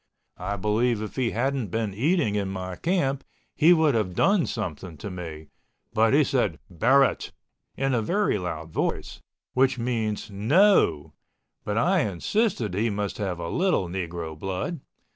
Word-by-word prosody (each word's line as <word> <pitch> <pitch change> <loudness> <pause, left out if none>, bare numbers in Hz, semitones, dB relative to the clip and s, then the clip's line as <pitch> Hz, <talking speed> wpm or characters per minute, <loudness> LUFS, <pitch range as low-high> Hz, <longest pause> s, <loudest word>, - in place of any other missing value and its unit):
I 100 +3 -2
believe 110 +4 +1
if 105 - -7
he 125 -3 +1
hadn't 130 +1 -1
been 110 +1 -2
eating 140 - +1
in 100 -2 -1
my 95 -1 -5
camp 140 - 0 0.3
he 160 +3 +5
would 160 -4 +4
have 100 -6 -1
done 195 - +3
something 90 - -5
to 100 +7 -7
me, 80 -4 -8 0.4
but 110 0 +3
he 145 +3 +5
said 125 - 0
"Barrett" 130 - +3 0.5
in 135 0 0
a 120 - +2
very 185 - +1
loud 80 -3 -5
voice, - - -3 0.3
which 130 0 +3
means 115 -4 -2
NO, 110 - +3 0.5
but 105 +1 -2
I 180 +10 +3
insisted 115 - 0
that 95 - -2
he 115 +2 +1
must 105 0 -3
have 95 -4 -2
a 85 0 -5
little 175 - +1
Negro 85 -3 -5
blood. 95 - -3
110 Hz, 160 wpm, -25 LUFS, 95-135 Hz, 0.5 s, he